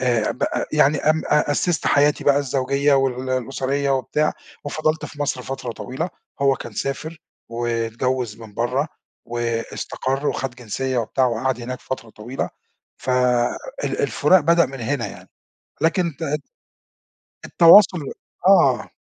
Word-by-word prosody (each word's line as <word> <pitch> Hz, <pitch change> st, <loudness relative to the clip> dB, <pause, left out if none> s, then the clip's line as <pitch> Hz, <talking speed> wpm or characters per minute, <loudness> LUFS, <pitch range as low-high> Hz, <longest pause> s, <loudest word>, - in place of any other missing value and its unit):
آآ 120 Hz, -4 st, +1 dB
بقى -, -, -2 dB
يعني 145 Hz, +1 st, +4 dB
أم 155 Hz, +1 st, +2 dB
أ 150 Hz, -1 st, +2 dB
أسِّست 160 Hz, +3 st, 0 dB
حياتي 145 Hz, +1 st, +3 dB
بقى 140 Hz, -1 st, +5 dB
الزوجية 140 Hz, +1 st, +1 dB
وال 130 Hz, -1 st, 0 dB
الأسرية 135 Hz, +2 st, -1 dB
وبتاع 135 Hz, +3 st, +1 dB, 0.3 s
وفضلت 155 Hz, +2 st, -1 dB
في 145 Hz, -, -10 dB
مصر 130 Hz, -3 st, -2 dB
فترة 130 Hz, -2 st, -5 dB
طويلة. 135 Hz, +10 st, -5 dB, 0.3 s
هو 135 Hz, -1 st, +4 dB
كان 120 Hz, -, -9 dB
سافر 155 Hz, +8 st, -4 dB, 0.3 s
واتجوّز 115 Hz, 0 st, -2 dB
من 110 Hz, -2 st, -12 dB
برّه 130 Hz, +6 st, 0 dB, 0.4 s
واستقر 120 Hz, +4 st, -3 dB
وخَد 130 Hz, -2 st, -3 dB
جنسية 130 Hz, +2 st, -3 dB
وبتاع 125 Hz, +3 st, +1 dB
وقعد 125 Hz, +1 st, -1 dB
هناك 125 Hz, +1 st, -6 dB
فترة 115 Hz, -4 st, -6 dB
طويلة، 120 Hz, +6 st, -5 dB, 0.5 s
ف 130 Hz, -, -4 dB, 0.7 s
ال -, -, -2 dB
الفُراق 185 Hz, -1 st, +4 dB
بدأ 170 Hz, +3 st, +4 dB
من 135 Hz, -2 st, -9 dB
هنا 120 Hz, +1 st, -1 dB
يعني. -, -, -11 dB, 0.5 s
لكن 165 Hz, -1 st, +1 dB
ت 150 Hz, -2 st, -2 dB, 1.0 s
التواصل 175 Hz, +1 st, +7 dB, 0.5 s
آه. -, -, +4 dB
135 Hz, 130 wpm, -22 LUFS, 120-145 Hz, 1.0 s, التواصل